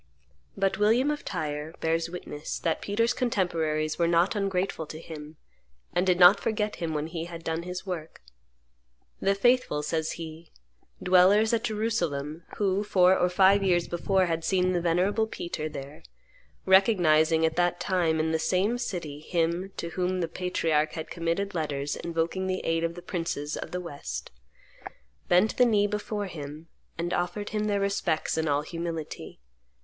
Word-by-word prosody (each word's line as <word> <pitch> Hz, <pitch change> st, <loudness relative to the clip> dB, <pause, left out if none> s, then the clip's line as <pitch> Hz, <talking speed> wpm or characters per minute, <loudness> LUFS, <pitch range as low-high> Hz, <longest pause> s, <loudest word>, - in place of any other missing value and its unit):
But 195 Hz, +1 st, 0 dB
William 235 Hz, +7 st, +3 dB
of 295 Hz, -, -4 dB
Tyre 155 Hz, -2 st, -4 dB
bears 165 Hz, +1 st, 0 dB
witness 165 Hz, -4 st, -6 dB
that 165 Hz, -2 st, -1 dB
Peter's 230 Hz, +4 st, +1 dB
contemporaries 165 Hz, -10 st, 0 dB
were 170 Hz, -, +3 dB
not 170 Hz, +4 st, +3 dB
ungrateful 195 Hz, -4 st, -1 dB
to 155 Hz, -, -8 dB
him, 155 Hz, -1 st, -9 dB, 0.6 s
and 180 Hz, +2 st, +1 dB
did 180 Hz, -1 st, +3 dB
not 180 Hz, +3 st, +8 dB
forget 210 Hz, -1 st, -1 dB
him 165 Hz, -3 st, -3 dB
when 150 Hz, 0 st, -1 dB
he 165 Hz, 0 st, -5 dB
had 170 Hz, -1 st, -9 dB
done 165 Hz, 0 st, -2 dB
his 180 Hz, +2 st, -6 dB
work. 165 Hz, -, -6 dB, 1.0 s
"The 195 Hz, +1 st, +2 dB
faithful," 245 Hz, -9 st, +2 dB
says 160 Hz, +1 st, -1 dB
he, 160 Hz, 0 st, -9 dB, 0.5 s
"dwellers 190 Hz, +5 st, +5 dB
at 230 Hz, -, +1 dB
Jerusalem, 170 Hz, -8 st, -2 dB
who, 200 Hz, 0 st, +1 dB
four 185 Hz, -2 st, +4 dB
or 180 Hz, -, +2 dB
five 195 Hz, +2 st, +5 dB
years 175 Hz, -3 st, +2 dB
before 190 Hz, +2 st, +1 dB
had 165 Hz, -1 st, -2 dB
seen 185 Hz, +1 st, +2 dB
the 175 Hz, -, 0 dB
venerable 185 Hz, +6 st, +1 dB
Peter 170 Hz, -8 st, -4 dB
there, 140 Hz, 0 st, -8 dB, 0.6 s
recognizing 165 Hz, -5 st, +4 dB
at 160 Hz, 0 st, 0 dB
that 175 Hz, 0 st, +2 dB
time 170 Hz, -4 st, +1 dB
in 160 Hz, +1 st, +1 dB
the 160 Hz, -, +1 dB
same 195 Hz, +8 st, +1 dB
city 170 Hz, -, -4 dB
him 170 Hz, +3 st, -1 dB
to 170 Hz, -, -4 dB
whom 185 Hz, +1 st, -1 dB
the 170 Hz, -, 0 dB
patriarch 165 Hz, -3 st, 0 dB
had 160 Hz, -, -6 dB
committed 170 Hz, +4 st, -2 dB
letters 145 Hz, -4 st, -2 dB
invoking 170 Hz, +3 st, -2 dB
the 185 Hz, 0 st, -1 dB
aid 165 Hz, 0 st, 0 dB
of 165 Hz, 0 st, -1 dB
the 175 Hz, -, -9 dB
princes 160 Hz, -4 st, -3 dB
of -, -, -6 dB
the 180 Hz, -, -3 dB
West, 170 Hz, -5 st, -6 dB, 1.0 s
bent 185 Hz, +5 st, +3 dB
the 250 Hz, -, +6 dB
knee 210 Hz, -3 st, +3 dB
before 210 Hz, 0 st, -3 dB
him, 155 Hz, -2 st, -8 dB, 0.3 s
and 170 Hz, +1 st, -2 dB
offered 180 Hz, +4 st, -2 dB
him 215 Hz, -1 st, -1 dB
their 205 Hz, -1 st, +1 dB
respects 195 Hz, -5 st, 0 dB
in 160 Hz, 0 st, 0 dB
all 145 Hz, 0 st, +1 dB
humility. 165 Hz, -, -6 dB
175 Hz, 165 wpm, -27 LUFS, 160-195 Hz, 1.0 s, not